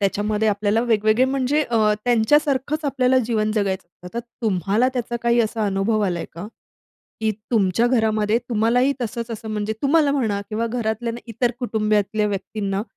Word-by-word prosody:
त्याच्यामध्ये 210 +2 0
आपल्याला 205 +1 +1
वेगवेगळे 220 +1 +3
म्हणजे 270 +3 +1
अ, 240 -5 -2 0.3
त्यांच्यासारखंच 275 +5 +2
आपल्याला 260 -2 +2
जीवन 215 -2 0
जगायचं. 195 -4 -1 0.2
आता 205 +6 -5
तुम्हाला 220 -1 0
त्याचा 240 -1 -2
काही 235 0 +3
असा 220 -1 -1
अनुभव 200 +3 0
आलाय 175 -3 -2
का, 170 +5 -7 0.7
की 220 0 +1 0.2
तुमच्या 220 0 +2
घरामध्ये 220 -3 +2
तुम्हालाही 240 +4 +2
तसंच 235 +1 -4
असं 225 0 -6
म्हणजे 210 0 -2
तुम्हाला 290 0 +3
म्हणा 220 -8 0
किंवा 225 +2 -1
घरातल्या 230 0 -2
इतर 235 +1 0
कुटुंबातल्या 215 -2 0
व्यक्तींना 200 0 -3
220 Hz, 145 wpm, -22 LUFS, 210-245 Hz, 0.7 s, वेगवेगळे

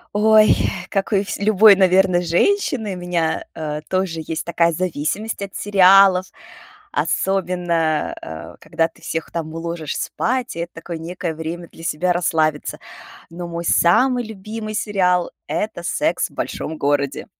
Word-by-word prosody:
Ой, 215 0 +6 0.4
как 195 +1 -1
у 200 -1 +2
всь 195 - -5
любой, 210 0 +6
наверно, 185 -1 +3
женщины, 220 - +1
у 180 - -6
меня, 175 -2 -1
а, 150 -1 -4
тоже 185 -1 -2
есть 160 -1 -3
такая 170 0 +2
зависимость 185 +6 -3
от 200 -1 -6
сериалов. 195 -1 +5 0.6
Особенно, 175 -4 0
э, 80 0 -9
когда 165 - 0
ты 165 - -24
всех 165 0 -4
там 160 -2 -4
уложишь 165 -2 -4
спать, 255 +1 -2
и 170 - -6
это 170 +1 -5
такое 165 0 -7
некое 170 0 -4
время 165 +2 -6
для 165 - -13
себя 175 +3 0
расслабиться. 160 -3 0 0.5
Но 175 +1 -6
мой 170 0 -5
самый 245 +11 +3
любимый 215 0 -7
сериал- 180 -5 +1 0.2
это 175 +4 -3
"Секс - - 0
в - - -22
большом 160 0 -4
городе". 140 -1 -1
175 Hz, 145 wpm, -20 LUFS, 165-195 Hz, 0.6 s, Ой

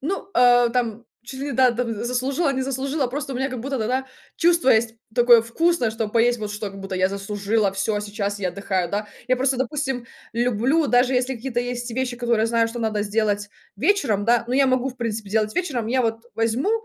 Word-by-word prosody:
ну, 385 +7 -3
э, 245 -1 +5
там 235 -2 -2 0.2
чуть 260 +2 -9
ли 285 - -3
ни, - - -3
да, 255 0 +4
там 235 -1 -2
заслужила, 265 +5 0
не 260 0 -1
заслужила 270 +1 -1
просто 275 +2 -4
у - - -2
меня 265 +2 -1
как 255 -2 -5
будто 270 +1 -3
тогда 255 +4 -1 0.3
чувство 340 -5 +3
есть 225 0 +3 0.2
такое 240 -2 +6
вкусное, 250 0 +1
чтоб 220 -1 -3
поесть 240 +1 +3
вот 210 -1 -4
что, 205 -1 -4
как 195 - -10
будто 195 0 -5
я 185 0 +2
заслужила 200 +1 -1
всё 205 +2 -1
сейчас 205 -1 -3
я 185 -2 -1
отдыхаю, 185 -1 -2
да. 210 +1 -2 0.2
Я 255 - +3
просто 265 +1 +1
допустим 265 -2 -2 0.3
люблю 245 +6 +1
даже 245 +1 +3
если 255 +1 0
какие-то 240 0 -3
есть 245 0 -4
вещи 250 0 -2
которые 235 -2 +1
я - - +2
знаю 230 0 +2
что 240 - -6
надо 215 -2 -1
сделать 205 -1 -1 0.3
вечером, 220 - +1
да, 235 0 +3
но 250 - -1
я 275 0 +4
могу 255 0 +1
в 250 - -9
принципе 220 -3 -4
делать 215 0 0
вечером, 275 -11 -1
я 255 +2 +2
вот 225 0 -1
возьму, 230 - 0
240 Hz, 215 wpm, -23 LUFS, 215-260 Hz, 0.3 s, такое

